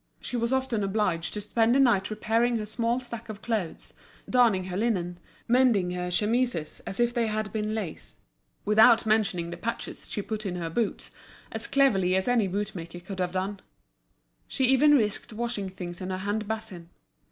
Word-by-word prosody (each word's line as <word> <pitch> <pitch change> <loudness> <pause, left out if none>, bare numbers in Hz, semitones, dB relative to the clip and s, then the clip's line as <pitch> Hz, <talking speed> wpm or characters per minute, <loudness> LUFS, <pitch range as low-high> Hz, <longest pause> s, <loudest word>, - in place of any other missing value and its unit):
She - - -5
was 235 0 0
often 260 -5 0
obliged 195 -4 0
to 210 - -3
spend 225 +3 +2
the - - +4
night 230 -8 +3
repairing 225 +3 +1
her 215 - -3
small 230 +3 0
stack 235 -2 -7
of 210 -1 -8
clothes, 215 -8 -3 0.3
darning 235 -7 +4
her 180 -1 -5
linen, 185 -5 -1 0.3
mending 235 -7 +3
her 180 0 -3
chemises 210 -3 0
as 195 - -5
if 240 0 +2
they 235 -2 +1
had 215 -1 -2
been 215 0 -1
lace; 195 -8 -6 0.5
without 220 +3 +6
mentioning 200 -6 +1
the - - -6
patches 230 +1 -5
she 205 - -3
put 215 0 -4
on 180 - -3
her 165 -2 -4
boots, 220 +3 -2 0.4
as - - -3
cleverly 195 -10 +3
as 190 +3 0
any 240 -5 +3
bootmaker 185 -3 -4
could 185 +2 -8
have 180 -1 -1
done. 190 +2 -2 0.9
She 265 - -2
even 285 +3 +6
risked 215 0 -1
washing 220 -3 -2
things 180 -2 -7
in 185 - -4
her 185 - -2
hand 205 +2 -2
basin. 215 -6 -5
215 Hz, 180 wpm, -27 LUFS, 185-235 Hz, 0.9 s, without